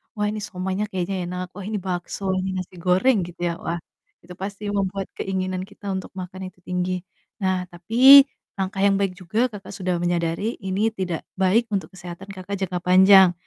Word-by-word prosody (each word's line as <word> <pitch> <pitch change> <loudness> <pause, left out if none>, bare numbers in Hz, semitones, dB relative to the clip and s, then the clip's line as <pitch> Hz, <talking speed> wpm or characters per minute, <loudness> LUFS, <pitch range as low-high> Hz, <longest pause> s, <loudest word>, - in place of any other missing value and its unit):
"Wah, 210 -1 0
ini 215 +1 -2
siomaynya 190 +2 -2
kayaknya 190 +1 -2
enak, 180 +1 -4
wah 200 - -7
ini 210 +1 -3
bakso, 180 +1 -4
ini 185 +1 -1
nasi 185 0 -6
goreng," 185 +5 +3
gitu 175 - -13
ya. 170 - 0
Wah, 170 +1 -2 0.4
itu 180 +1 -10
pasti 200 +2 -6
membuat 195 -1 -1
keinginan 185 -1 -2
kita 200 +1 -11
untuk 190 - -5
makan 185 +1 -7
itu 180 - -30
tinggi. 180 0 -1 0.4
Nah, 185 -2 0
tapi 260 +10 +8 0.3
langkah 195 +1 -1
yang 200 0 +4
baik 195 -2 0
juga 200 +7 0
Kakak 205 -5 -10
sudah 185 -2 -2
menyadari 175 +5 -1
ini 200 +3 0
tidak 185 -5 -3 0.2
baik 215 +5 +3
untuk 195 -1 -3
kesehatan 180 +1 -9
Kakak 195 0 -6
jangka 185 -2 -2
panjang. 190 0 +7
190 Hz, 180 wpm, -23 LUFS, 180-200 Hz, 0.4 s, tapi